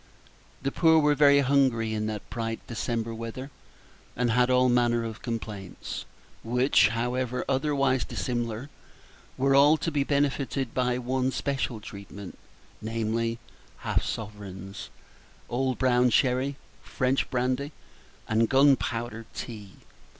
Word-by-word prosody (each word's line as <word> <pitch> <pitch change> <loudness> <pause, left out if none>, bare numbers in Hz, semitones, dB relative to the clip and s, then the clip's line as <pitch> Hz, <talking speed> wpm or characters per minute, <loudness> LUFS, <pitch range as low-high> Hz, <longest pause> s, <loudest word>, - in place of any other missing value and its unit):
The 135 - 0
poor 160 +1 +5
were 150 -1 +4
very 140 0 +6
hungry 130 -5 +2
in 110 0 -1
that 105 -1 -5
bright 115 -1 -4
December 115 -1 -3
weather, 115 +4 -6 0.6
and 120 -1 +1
had 125 +2 +3
all 125 0 +4
manner 120 -1 +2
of 115 -1 -6
complaints, 105 -5 -5 0.4
which, 125 +4 +4
however 125 +2 -2
otherwise 135 -2 +1
dissimilar, 120 +2 -3 0.7
were 135 +1 +3
all 145 +3 +6
to 165 - -2
be 145 -2 +1
benefited 140 -3 0
by 125 -1 +1
one 130 +1 -1
especial 130 -3 -2
treatment, 100 -1 -10 0.4
namely, 115 +1 -1 0.5
half - - +1
sovereigns, 100 -3 -6 0.6
old 130 +1 0
brown 125 -1 +3
sherry, 130 +3 +2 0.3
French 130 0 0
brandy, 130 +3 -1 0.6
and 115 +1 +2
gunpowder 120 -4 +2
tea. 105 -5 -7
125 Hz, 120 wpm, -27 LUFS, 115-135 Hz, 0.7 s, very